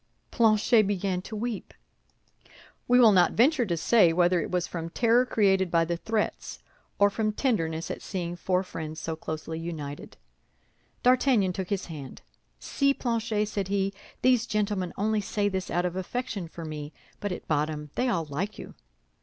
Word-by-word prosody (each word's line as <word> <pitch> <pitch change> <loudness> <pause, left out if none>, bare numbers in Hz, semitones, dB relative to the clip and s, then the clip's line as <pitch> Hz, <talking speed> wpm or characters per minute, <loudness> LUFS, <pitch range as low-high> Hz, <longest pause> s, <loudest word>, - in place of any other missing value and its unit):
Planchet 220 -1 +4
began 190 -2 -1
to 220 - -8
weep. 225 0 -4 1.1
We 245 +1 +5
will 230 -3 +8
not 180 -3 +4
venture 255 0 +3
to 170 -2 -1
say 180 0 +5
whether 175 +1 +3
it - - -4
was 180 -2 0
from 165 -1 -5
terror 240 +6 +3
created 195 -5 +2
by 165 -1 +3
the 170 +1 -1
threats 215 +5 -2 0.4
or 200 0 +4
from 215 +1 0
tenderness 165 - -1
at - - -6
seeing 175 -2 -4
four 180 +1 0
friends 160 -3 -6
so 160 +1 -4
closely 160 0 -5
united. 155 -4 -7 0.9
D'Artagnan 245 -6 +3
took 190 -1 -4
his 200 -2 -1
hand. 145 -6 -9 0.4
"See, 275 - +1
Planchet," 225 -3 -1
said 200 -2 -3
he, 195 0 0 0.3
"these 250 -2 +4
gentlemen 205 -4 -1
only 215 +1 +1
say 205 +1 -1
this 190 -2 -3
out 175 +1 0
of 180 0 -2
affection 200 0 -4
for 165 0 -9
me, 150 -1 -6 0.3
but 205 - -3
at 180 - -6
bottom 150 -1 -1
they 255 - 0
all 170 -9 0
like 175 +9 -4
you." - - -9
190 Hz, 170 wpm, -27 LUFS, 165-220 Hz, 1.1 s, will